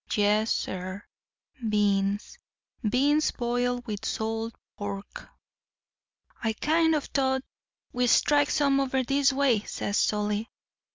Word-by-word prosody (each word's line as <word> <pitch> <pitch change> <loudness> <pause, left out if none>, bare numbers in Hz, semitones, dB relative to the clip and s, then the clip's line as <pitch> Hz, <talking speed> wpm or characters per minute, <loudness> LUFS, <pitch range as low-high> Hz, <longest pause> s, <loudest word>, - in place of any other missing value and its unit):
Yes, 210 +1 +2
sir, 185 +2 -3 0.6
beans—beans 210 - 0
boiled 245 0 -1
with 215 -2 -5
salt 225 +1 -2 0.2
pork. 200 -1 -7 1.1
"'I 225 -1 +1
kind 320 +6 +2
of 295 - -1
thought 265 -1 0 0.5
we'd 250 0 +1
strike 290 +4 +4
some 280 -2 +2
over 265 -1 0
this 275 +2 +3
way,' 265 -5 +3
says 205 0 -3
Solly. 210 +1 0
235 Hz, 105 wpm, -27 LUFS, 210-275 Hz, 1.1 s, strike